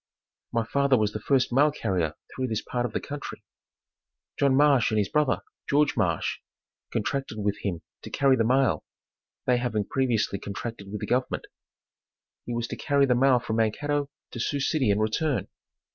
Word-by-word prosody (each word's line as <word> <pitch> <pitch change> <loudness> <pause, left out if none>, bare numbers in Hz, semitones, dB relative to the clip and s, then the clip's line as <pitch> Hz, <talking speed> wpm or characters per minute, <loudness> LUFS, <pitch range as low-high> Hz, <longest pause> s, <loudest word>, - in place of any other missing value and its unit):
My 115 -1 0
father 140 +2 +3
was 105 -2 +1
the 105 - -3
first 130 +2 +1
mail 145 +4 +5
carrier 90 - -1 0.2
through 130 0 -1
this 110 -3 -2
part 120 0 -1
of - - -11
the - - 0
country. 145 0 -7 1.0
John 140 -2 +4
Marsh 140 -3 +5
and 110 - 0
his 105 -2 +1
brother, 150 -3 +2 0.3
George 145 0 +3
Marsh 90 -8 0 0.5
contracted 135 -5 -2
with 105 0 -1
him 85 -5 -3 0.2
to - - -8
carry 140 -2 +3
the 115 - +2
mail, 125 - +2 0.6
they 125 -1 +3
having 120 -4 -1
previously 115 -5 0
contracted 100 0 -6
with 105 - -5
the - - -2
government. 125 +1 0 1.0
He 120 - -2
was 120 0 -1
to - - -3
carry 140 -1 +2
the 130 - +3
mail 130 +1 +5
from 115 -2 -2
Mankato 145 +6 0 0.2
to 120 - -6
Sioux 140 +4 -1
City 140 -3 +1
and 100 +1 +3
return. 125 +6 0
125 Hz, 175 wpm, -27 LUFS, 105-140 Hz, 1.0 s, mail